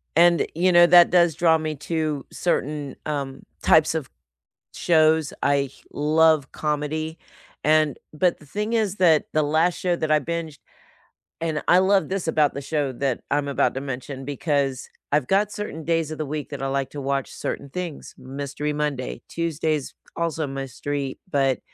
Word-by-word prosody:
And, 170 0 +5
you 180 +3 +3
know, 175 0 +8
that 175 0 +7
does 170 -3 +4
draw 165 0 +4
me 155 -1 -3
to 155 -1 -2
certain, 150 -5 -2
um, 140 -3 -4 0.2
types 160 0 +4
of 155 -5 -3 0.6
shows, 160 -2 +3
I 140 -1 +2 0.2
love 155 -1 +3
comedy, 155 +2 -2 0.5
and 155 -3 +3 0.2
But 170 +3 +1
the - - -15
thing 210 +9 -3
is 210 -4 +1
that 165 -6 +4
the 155 - +2
last 160 +4 +2
show 180 -1 0
that 155 -2 -2
I 155 0 +4
binged 160 -1 -4 0.8
And 160 -2 -1
I 175 - +7
love 190 +1 +3
this 190 -3 -2
about 155 -3 +2
the - - -4
show 145 -1 -1
that 130 0 -1
I'm 145 0 +1
about 140 - +1
to 135 - -3
mention 135 0 -6
because 140 -2 -1 0.2
I've 145 -4 +2
got 205 +2 +2
certain 210 -6 -5
days 165 -2 +1
of 155 - -5
the 155 - -3
week 150 0 -5
that - - -6
I - - 0
like 135 0 -1
to 145 - -6
watch 135 0 -2
certain 140 - -5
things. 175 -1 -6
Mystery 140 +3 -4
Monday. 145 -3 -3
Tuesdays 160 -3 -2 0.2
also 165 -1 -1
a - - -6
mystery, 135 +1 -4
but 135 -3 +2
155 Hz, 170 wpm, -24 LUFS, 140-165 Hz, 0.8 s, know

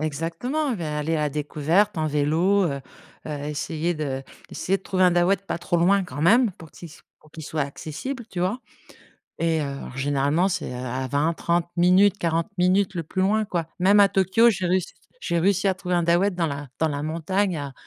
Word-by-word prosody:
Exactement, 165 - -2
beh 185 -8 -4
aller 150 +2 -1
à 150 -1 0
découverte 155 +7 0
en 155 - 0
vélo, 160 +7 +2
heu 140 -4 -2 0.5
heu, - - -5 0.2
essayer 155 +3 -2
de 140 -5 -3 0.3
essayer 195 +1 -1
de - - -27
trouver 185 -1 0
un 180 - +6
Dahouët 175 +2 +2
pas - - -3
trop 175 +1 -1
loin 190 +3 +3
quand 145 -4 -6
même 225 +5 +4
pour 160 -3 -14
qu'il 170 - -11
s 150 - -16 0.2
pour 155 - -22
qu'il 160 - -10
soit 155 +1 -3
accessible, 160 - -6
tu 175 - -4
vois? 190 +8 -1 0.8
Et 165 -1 +1
heu, - - -1
alors 140 -2 -7
généralement 145 +5 +1
c'est, 190 - -3
heu - - -6
à 130 +1 -4
20-30 165 +5 0
minutes, 185 +3 +4
40 165 -2 0
minutes 185 +2 +2
le 170 - -2
plus 185 +4 -3
loin, 215 +3 +2
quoi. 175 -6 -3
Même 195 +3 +5
à 200 - +7
Tokyo 195 +5 +4
j'ai 185 -5 -1
réussi, 185 0 0 0.3
j'ai 170 - -1
réussi 195 +2 +2
à 190 - +3
trouver 180 -1 -3
un 175 - +2
Dahouët 175 +4 +2
dans 170 -2 0
la 140 -1 -6
dans 160 - +2
la 145 -1 -3
montagne 175 +4 -1
à 140 -2 -6
170 Hz, 210 wpm, -24 LUFS, 150-190 Hz, 0.8 s, à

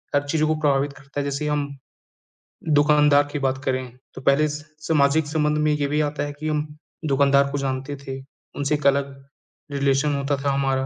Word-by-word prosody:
हर 145 - +3
चीज़ 155 +1 +1
को 155 0 +2
प्रभावित 145 -2 +1
करता 140 +1 -8
है। 145 - 0
जैसे 140 +1 -2
हम, 150 -1 0 1.1
दुकानदार 145 -1 +5
की 145 - -3
बात 135 -1 0
करें 130 -2 -3 0.2
तो - - -9
पहले 140 +3 +3
स 150 0 -6 0.2
सामाजिक 150 0 +3
संबंध 150 0 +1
में 150 - +3
ये 150 -1 0
भी 150 +1 0
आता 145 -1 -1
है 145 - -4
कि 155 - -4
हम 150 0 0 0.4
दुकानदार 140 -1 +3
को 145 - -2
जानते 135 +1 -3
थे, 135 -1 -7 0.4
उनसे 145 +1 0
एक 145 -1 0
अलग 140 0 +2 0.6
रिलेशन 140 +1 +1
होता 140 0 -1
था 140 - +2
हमारा। 135 -1 0
145 Hz, 195 wpm, -23 LUFS, 140-150 Hz, 1.1 s, दुकानदार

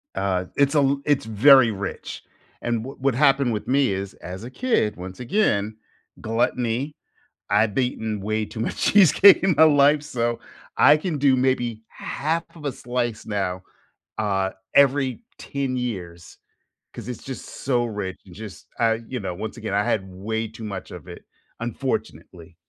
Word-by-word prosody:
Uh, 95 -2 -1
it's 140 +2 +3
a 140 -1 +3
it's 145 -2 +1
very 120 +3 +6
rich. 100 -2 -6 0.4
And 120 -2 -1
w 135 +3 -9
what 135 -2 +1
happened 135 -2 +3
with 105 - -4
me 135 -3 +2
is, 95 0 -4
as 90 +4 -8
a 120 - -7
kid, 230 - 0
once 90 +1 -8
again, 110 - 0 0.4
gluttony. 120 +4 -1 0.5
I've 105 +1 +2
eaten 110 -4 -1
way 110 +2 -1
too 110 - -7
much - - -3
cheesecake 195 0 +6
in 190 -2 +3
my 160 - +8
life, 145 -1 +5
so 120 -5 -2 0.4
I 145 +2 +7
can 155 0 -3
do 135 -1 +4
maybe 125 -4 0
half 160 +4 -3
of 155 -3 -11
a 140 - 0
slice 120 -2 -3
now, 95 -3 -2 0.6
uh, 95 -3 0 0.2
every 140 - +3 0.2
10 135 -2 -3
years, 90 -9 -6 0.6
'cause 110 - -9
it's 125 - -6
just 135 -1 -7
so 125 -3 -1
rich 100 -4 -5
and 90 - -13
just, 105 0 -10
uh, 115 -1 +3
you 125 -2 -4
know, 95 -3 -4
once 105 +5 -6
again, 110 -4 -5
I 100 +1 +2
had 95 -3 0
way 110 +5 -3
too 110 +1 -10
much 100 -3 -6
of - - -10
it, - - -10 0.4
unfortunately. 80 -2 -5
115 Hz, 165 wpm, -23 LUFS, 105-135 Hz, 0.6 s, my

